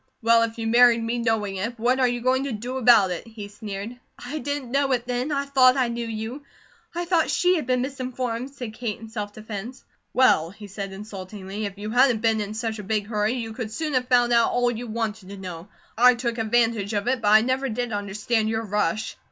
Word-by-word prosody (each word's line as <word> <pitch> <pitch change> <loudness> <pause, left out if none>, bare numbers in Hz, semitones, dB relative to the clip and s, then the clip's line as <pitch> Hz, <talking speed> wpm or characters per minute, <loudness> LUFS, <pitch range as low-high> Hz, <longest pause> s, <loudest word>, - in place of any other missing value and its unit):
"Well, 230 0 +5
if 230 0 -1
you 225 - -4
married 235 0 +5
me 235 +1 -1
knowing 220 -4 0
it, 230 +5 -3
what 245 +3 +1
are 255 - +4
you 240 0 -2
going 260 +2 +1
to 280 - -3
do 240 +4 -4
about 230 -7 +5
it?" 180 +6 -5
he 220 -2 -8
sneered. 205 +3 -7 0.2
"I 285 +5 -6
didn't 285 -2 -4
know 275 0 +1
it 245 -1 -1
then. 250 +4 -2
I 280 -1 0
thought 260 -2 +5
I 255 -2 +2
knew 235 0 -3
you. 225 +5 -5 0.5
I 345 0 -2
thought 340 -2 +2
she 360 +1 +3
had 310 -8 -2
been 250 -1 +1
misinformed," 255 -2 -4
said 250 -5 -7
Kate, 220 -2 -4
in 225 0 -10
self 210 -2 -5
defence. 215 +3 -8 0.3
"Well," 170 -11 +4
he 205 +3 -12
said 200 0 -6
insultingly, 195 0 -7
"if 195 0 -10
you 210 +1 -5
hadn't 245 -2 +4
been 225 -1 +2
in 210 +1 -5
such 220 -1 -3
a - - -6
big 210 +1 -1
hurry, 210 +1 0
you 230 -3 -4
could 220 -2 -5
soon 305 +5 -3
have 250 -1 +1
found 245 -1 +4
out 235 -1 +4
all 245 0 +1
you 240 +1 -6
wanted 220 -3 -4
to 200 - -8
know. 180 -2 -8 0.3
I 250 +2 +6
took 235 -1 -3
advantage 225 -2 +1
of 205 +2 -1
it, 255 -1 +1
but 210 - -1
I 215 +1 +7
never 260 +3 0
did 240 +1 -3
understand 210 +2 -1
your 220 0 -1
rush." 210 0 -1
230 Hz, 230 wpm, -24 LUFS, 210-250 Hz, 0.5 s, I